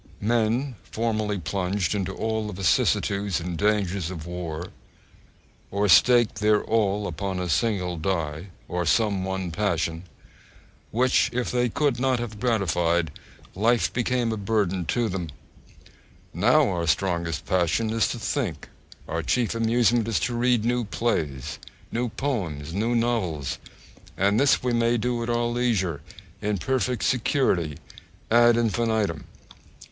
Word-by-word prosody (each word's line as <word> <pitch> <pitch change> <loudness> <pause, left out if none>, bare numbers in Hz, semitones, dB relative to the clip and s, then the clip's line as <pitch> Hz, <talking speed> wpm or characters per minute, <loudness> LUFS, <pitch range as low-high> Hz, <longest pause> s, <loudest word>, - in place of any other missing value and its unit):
Men 120 +3 0
formerly 110 0 -2
plunged 90 +1 -1
into 95 -2 -2
all 110 +1 -2
the 105 - -5
vicissitudes 100 +1 +1
and 85 +1 -4
dangers 100 -3 0
of 85 -4 -7
war, 85 -1 -5 1.0
or 100 +1 0
staked 120 +3 +5
their 105 0 +3
all 105 -2 +1
upon 95 -2 -3
a 90 - -2
single 90 +1 0
die, 80 -1 -2 0.2
or 90 0 -2
some 100 +4 +2
one 95 -2 -3
passion, 85 -4 -1 0.9
which 125 +3 +2
if 125 0 -2
they 125 -1 +1
could 140 0 0
not 130 -1 +2
have 115 -3 -5
gratified, 85 - +1 0.4
life 115 +4 +2
became 120 -1 0
a 110 - -2
burden 100 -3 0
to 120 +6 +1
them 90 -4 -4 1.0
now 125 - +4
our 85 -3 -1
strongest 85 -2 0
passion 95 +5 +1
is 115 0 +2
to - - -3
think, 110 - -3 0.4
our - - -2
chief 120 -3 0
amusement 115 0 +2
is 115 - +1
to 120 - -1
read 120 -2 +2
new 120 0 +1
plays, 75 - -2 0.3
new 120 +1 -1
poems, 85 - -3
new 115 +5 0
novels, 105 - -1 0.6
and 100 +3 +2
this 140 -1 +3
we 125 -1 0
may 115 0 +2
do 120 +1 -1
at 115 - -3
our 120 0 +1
leisure, 115 - 0 0.4
in 105 -1 0
perfect 125 +4 -1
security, 110 - +1 0.5
ad 120 0 +6
infinitum. 110 -7 0
105 Hz, 135 wpm, -25 LUFS, 90-120 Hz, 1.0 s, ad